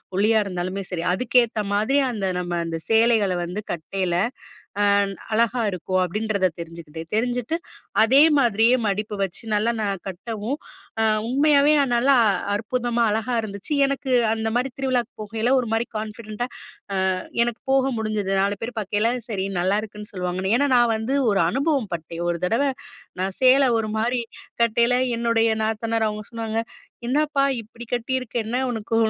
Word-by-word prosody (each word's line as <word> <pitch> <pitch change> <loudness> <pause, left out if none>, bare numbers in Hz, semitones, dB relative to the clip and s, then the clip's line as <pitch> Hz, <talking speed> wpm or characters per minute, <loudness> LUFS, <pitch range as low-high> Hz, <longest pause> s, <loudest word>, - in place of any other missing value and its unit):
ஒல்லியா 215 +3 +3
இருந்தாலுமே 185 0 -3
சரி. 175 -3 -3
அதுக்கேத்தமாரி 220 +1 +1
அந்த 210 -4 -3
நம்ம 175 -1 -3
அந்த 165 0 -3
சேலைகள 225 -3 +4
வந்து 180 +5 -4
கட்டையில 175 +1 -2 0.7
அ - - +4 0.5
அழகா 235 +2 +2
இருக்கும்." 185 0 -1
அப்பிடின்றத 200 0 0
தெரிஞ்சுக்கிட்டு, 165 -1 -8
தெரிஞ்சிட்டு 245 +5 0 0.5
அதேமாரியே 255 -3 +5
மடிப்பு 210 +2 -2
வச்சு 190 - -7
நல்லா 215 +3 +2
நான் 195 -3 -3
கட்டவும் 220 +7 -4 0.4
அ - - +3 0.3
உண்மையாவே 285 +2 +4
நான் 265 -4 +1
நல்லா, 265 +4 +4 0.4
அற்புதமா, 235 +2 -1
அழகா 220 +3 -1
இருந்துச்சு. 200 +4 -6
எனக்கு 275 0 -3 0.2
அந்தமாரி 225 +3 0
திருவிழாக்கு 255 -4 0
போகையில 220 +3 -2
ஒரு 245 - -4
மாரி 225 +1 +1
கான்ஃபிடென்ட்டா 215 +1 -5 0.7
அ - - -3 0.3
எனக்கு 240 -1 -4
போக 270 0 +3
முடிஞ்சுது. 215 -3 -1
4 200 +1 +1
பேரு 230 +2 -4
பாக்கையில, 210 +2 0 0.2
சரி 195 -4 -2 0.2
நல்லாயிருக்குன்னு 210 +3 -2
சொல்லுவாங்கனு. 185 +1 -2
ஏன்னா, 285 +3 +2
நான் 240 -1 +4
வந்து 220 +5 -2 0.2
ஒரு 200 -1 +2
அனுபவம் 275 -4 0
பட்டேன். 165 0 -5
ஒரு 170 0 0
தடவ 225 +9 +1 0.6
நான் 190 0 -1
சேல 260 +2 +6
ஒரு 220 -1 -2
மாரி 240 +3 0 0.4
கட்டையில 235 +2 +3 0.2
என்னுடைய 230 -1 +2
நாத்தனார் 225 +1 0
அவுங்க 210 0 -3
சொன்னாங்க, 225 -1 -3 0.5
"என்னப்பா! 290 +1 +2 0.2
இப்பிடி 230 +2 -11
கட்டியிருக்க? 250 0 -2
என்ன 245 +3 -1
உனக்கு 225 -1 -2
220 Hz, 140 wpm, -23 LUFS, 200-245 Hz, 0.7 s, சேல